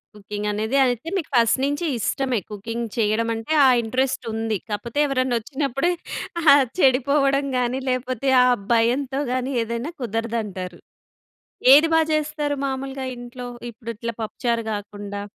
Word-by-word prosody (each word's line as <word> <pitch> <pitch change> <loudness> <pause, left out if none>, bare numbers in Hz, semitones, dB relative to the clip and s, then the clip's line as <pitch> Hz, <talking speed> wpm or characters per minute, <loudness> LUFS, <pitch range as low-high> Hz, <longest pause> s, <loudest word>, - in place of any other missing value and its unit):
Cooking 210 0 -5
అనేది 220 +6 -1
అయితే, 245 +3 -2
మీకు 350 - -4
ఫస్ట్ 230 +1 +4
నుంచి 290 +5 -1
ఇష్టమే. 255 +1 0
కుకింగ్ 230 +3 -4
చెయ్యడమంటే, 225 +4 0
ఆ - - +7
ఇంట్రెస్టుంది. 225 -2 -1
కాపోతే 225 +6 -3
ఎవరన్నొచ్చినప్పుడే 270 +4 0 0.5
ఆహ్! 285 -3 +7
చెడిపోవడం 275 0 +3
గానీ, 250 +1 0
లేపోతే, 255 +1 -1 0.2
ఆ - - +4 0.3
భయంతో 255 +4 +1
గానీ, 255 +1 -1
ఏదైనా 235 +7 -4
కుదరదంటారు. 220 -6 -3 0.9
ఏది 300 +3 +7
బా 325 - +6
చేస్తారు 300 -1 -1
మాములుగా 270 0 -4
ఇంట్లో, 245 +1 -8 0.3
ఇప్పుడిట్ల 230 0 -6
పప్పుచారు 230 +1 -1
గాకుండా? 205 -1 -5
245 Hz, 115 wpm, -23 LUFS, 225-275 Hz, 0.9 s, ఆ